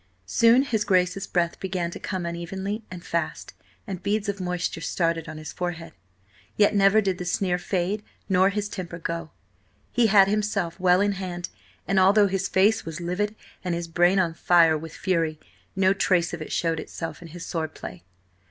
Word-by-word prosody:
Soon 230 - +5
his 220 -6 0
Grace's 185 -1 +1
breath 170 -1 0
began 180 -3 -2
to - - -7
come 185 -3 -3
unevenly 190 +5 -4
and 180 -1 -9
fast, 170 0 -3 0.3
and 190 -4 -6
beads 210 +1 -1
of 200 -1 -3
moisture 180 -2 -2
started 165 -1 -1
on 155 - -7
his 155 0 -7
forehead. 170 -2 -4 0.6
Yet 205 0 +4
never 200 +1 +5
did 190 -3 -1
the - - -3
sneer 180 0 0
fade 190 +3 -1 0.3
nor 190 0 +4
his 205 0 -2
temper 180 -4 -6
go; 165 -1 -4 0.6
he 240 -1 +3
had 195 -2 +6
himself 200 -4 -1
well 180 0 +4
in 205 0 +2
hand, 180 -2 -5 0.4
and 195 0 +3
although 200 +2 +6
his 190 -1 -1
face 205 +4 +3
was 165 +1 -6
livid, 190 +5 -2 0.3
and 180 -2 -1
his 170 0 -4
brain 175 +3 +3
on 175 -3 +2
fire 165 -1 +4
with 160 +1 -6
fury, 165 -5 0 0.4
no 190 0 +4
trace 180 -3 +1
of 170 - -5
it 155 - -6
showed 165 -2 0
itself 165 0 -6
in 170 - -9
his 170 +2 -8
sword 160 -3 -3
play. 90 -1 -8
180 Hz, 185 wpm, -25 LUFS, 170-195 Hz, 0.6 s, had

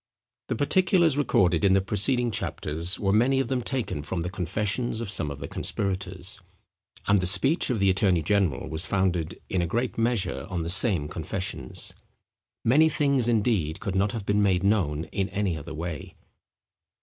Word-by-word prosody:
The - - -1
particulars 170 - +3
recorded 90 - +2
in 95 -1 +5
the 95 - +5
preceding 115 +5 +2
chapters 85 -2 -4
were 95 -1 +1
many 125 +6 +3
of 135 -3 -1
them 130 -2 0
taken 120 - -3
from 85 +3 -3
the 90 +2 -4
confessions 105 +6 -2
of 115 -4 -3
some 80 -7 0
of 70 - -6
the 70 0 -6
conspirators; 95 0 -4 0.7
and 100 0 +4
the 90 - -1
speech 135 - +2
of 125 - 0
the 100 -2 +3
attorney 95 -3 +2
general 95 -8 +1
was 80 +1 +1
founded, 90 -4 -1
in 95 - 0
a 85 - -1
great 120 +6 -2
measure, 115 -3 -1
on 90 -3 -2
the 85 - -4
same 95 - +3
confessions. 90 +5 -4 0.7
Many 150 +7 +5
things, 140 -5 +1
indeed, 105 -9 +1
could 100 - -4
not 100 +2 +1
have 110 -3 -5
been 100 +1 +2
made 95 -2 +2
known 90 -7 +1
in 100 -1 -1
any 100 -4 -1
other 80 +1 -7
way. 80 -2 -6
100 Hz, 175 wpm, -26 LUFS, 85-115 Hz, 0.7 s, in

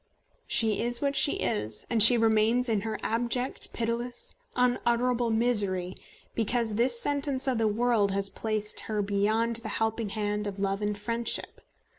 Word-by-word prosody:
She 220 -3 +2
is 240 +1 -1
what 280 -1 -2
she 285 - +3
is, 105 0 -1
and 230 -2 +3
she 235 +3 +10
remains 225 +2 +2
in 220 -3 -1
her 220 +1 -4
abject, 240 +3 -1
pitiless, 235 +1 -3 0.2
unutterable 245 -1 0
misery, 205 -6 +1 0.4
because 230 0 -1
this 235 +2 +2
sentence 285 -1 -1
of 255 -3 0
the 225 - +1
world 220 -1 +1
has 195 0 0
placed 215 0 -2
her 210 -1 -1
beyond 215 +3 0
the 230 -1 -5
helping 225 -1 -2
hand 210 0 -3
of 200 -1 -6
Love 195 0 -2
and 205 0 -2
Friendship. 230 +3 -3
225 Hz, 155 wpm, -27 LUFS, 210-240 Hz, 0.4 s, she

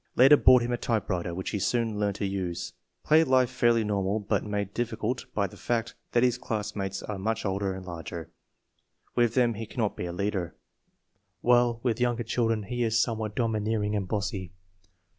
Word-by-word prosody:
Later 135 +4 +8
bought 130 -3 +6
him 120 - -2
a 120 - 0
typewriter, 95 -7 -1
which 95 - -4
he 105 - -1
soon 115 0 0
learned 100 -2 0
to 100 - -2
use." 95 -3 -3 0.3
Play 155 +1 +5
life 130 -3 +3
fairly 120 -2 +3
normal, 100 0 0
but 105 0 -1
made 105 -1 -3
difficult 120 +1 -2
by 100 - +2
the 105 - -8
fact 115 +4 -1 0.2
that 120 - +4
his 125 -1 +2
classmates 105 -5 -3
are 105 -2 -5
much 110 +3 -1
older 95 -1 -1
and 95 -1 -8
larger. 85 -1 -7 0.8
With 120 -1 +2
them 120 -2 +3
he 110 +1 -6
cannot 110 -2 -2
be - - -4
a - - -4
leader, 95 -1 -2 0.9
while 120 -1 +3
with 120 -2 0
younger 120 -1 +1
children 115 -1 0
he 120 +5 -4
is 115 -1 +2
somewhat 110 -3 -1
domineering 110 -2 0
and 100 -2 -1
bossy. 100 -3 -3
110 Hz, 180 wpm, -28 LUFS, 100-120 Hz, 0.9 s, Later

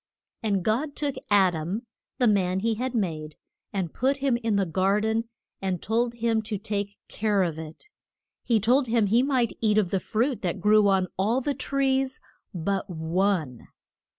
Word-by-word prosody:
And 200 -5 0
God 270 +7 0
took 290 -2 0 0.2
Ad 195 -3 +5
am, 175 +9 -3 0.3
the 250 - +2
man 190 -4 +2
he 230 +1 +1
had 250 +3 -3
made, 155 -7 -2 0.4
and 185 -5 -3
put 270 +3 +1
him 270 -3 +1
in 230 -3 -1
the 200 -1 +2
gar 190 +4 +1
den, 220 +2 0 0.4
and 190 -2 -1
told 235 +5 0
him 230 -1 +1
to 215 -1 -4
take 200 -1 -3
care 205 -2 +1
of 165 -3 -2
it. 160 0 -10 0.6
He 230 -3 +2
told 250 +6 +3
him 230 -2 +2
he 225 +5 +3
might 260 -4 +1
eat 215 -2 +3
of 200 -5 +2
the 195 - +1
fruit 235 +4 -1
that 175 -3 -2
grew 210 +1 +5
on 190 -2 +3
all 220 +6 +2
the 285 +2 -1
trees 270 -1 0 0.3
but 195 +3 -2
one. 165 - -1
210 Hz, 180 wpm, -26 LUFS, 190-235 Hz, 0.6 s, Ad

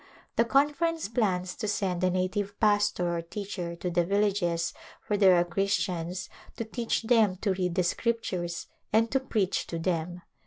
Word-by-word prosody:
The 230 - +4
Conference 295 +5 +2
plans 185 -6 0
to 220 - -3
send 190 -3 -1
a 185 - +4
native 190 +3 -1
pastor 205 -5 +2
or 170 - -1
teacher 175 -1 -5
to 175 +1 -3
the 175 0 +2
villages 180 -3 +1 0.3
where 205 - 0
there 190 -3 +6
are 175 0 +3
Christians 180 -1 -1 0.3
to 230 - -3
teach 230 +1 -2
them 220 -5 +4
to 200 -3 +1
read 180 -2 -1
the 185 - +2
Scriptures 175 -4 -1 0.3
and 225 +1 +3
to 270 - +3
preach 215 -7 -1
to 165 - -4
them. 175 +1 -2
190 Hz, 165 wpm, -28 LUFS, 175-215 Hz, 0.3 s, there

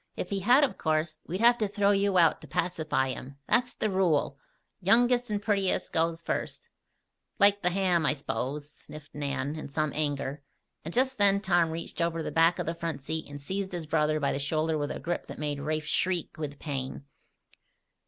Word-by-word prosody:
If 180 - -5
he 200 - 0
had, 245 +9 +5
of 250 -9 0
course, 155 0 0
we'd 185 +5 -3
have 240 +1 +6
to 215 - +1
throw 200 0 +2
you 200 -1 +2
out 165 -3 +4
to 155 - -11
pacify 155 -2 0
him. 130 +1 -7
That's 245 +1 +2
the - - 0
rule 170 -8 +1 0.4
youngest 240 +5 +3
and 210 -1 0
prettiest 200 -2 0
goes 165 0 0
first - - -4 0.3
" - - -45
"Like 200 0 +5
the 180 - +2
ham, 180 -2 +1
I - - +4
s'pose?" 140 +1 -4
sniffed 150 0 -12
Nan, 140 0 -3
in 155 - -7
some 155 +1 -1
anger, 145 -1 -2 0.4
and 165 - -5
just 260 +3 +1
then 200 -1 +4
Tom 175 -4 +2
reached 165 +1 -5
over 165 -1 0
the - - -4
back 165 +1 +4
of - - -2
the 165 - -1
front 165 -5 -4
seat 160 +1 -4
and 145 0 -7
seized 190 +6 -4
his 170 -2 -4
brother 155 0 +1
by 140 -2 +1
the - - -2
shoulder 155 +3 0
with 145 -1 -1
a - - -4
grip 170 +5 -3
that - - -8
made 145 -1 -2
Rafe 155 +1 -2
shriek 180 +2 0
with 145 -2 -5
pain. 135 -2 -5
165 Hz, 205 wpm, -28 LUFS, 150-195 Hz, 0.4 s, have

